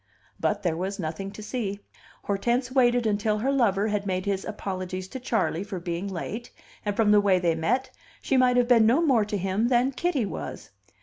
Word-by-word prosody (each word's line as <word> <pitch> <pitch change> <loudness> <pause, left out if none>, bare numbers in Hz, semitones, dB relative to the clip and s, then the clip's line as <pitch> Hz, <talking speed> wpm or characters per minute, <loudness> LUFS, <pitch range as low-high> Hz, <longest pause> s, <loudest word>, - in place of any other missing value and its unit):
But 205 0 0
there 170 -3 +1
was 190 +4 -3
nothing 170 +3 -4
to 210 +2 -10
see. 210 -4 -3 0.4
Hortense 240 +5 0
waited 245 -2 +3
until 210 0 +1
her 255 +6 0
lover 215 -6 +2
had 205 -1 -1
made 185 -1 -1
his 195 -1 -1
apologies 185 -3 -4
to 260 - -6
Charley 220 -8 0
for 200 -3 -5
being 175 +2 -4
late, 200 +5 -5 0.3
and, 205 -1 -2
from 215 -1 +3
the 210 0 +6
way 195 -2 +4
they 175 -2 +1
met, 250 +11 0 0.3
she 270 - -1
might 250 -1 +4
have 245 -1 +3
been 230 -3 +5
no 270 +9 +4
more 240 -8 +3
to 210 0 -2
him 195 +4 0
than 250 +2 +3
Kitty 275 -2 0
was. - - -7
210 Hz, 200 wpm, -26 LUFS, 190-245 Hz, 0.4 s, the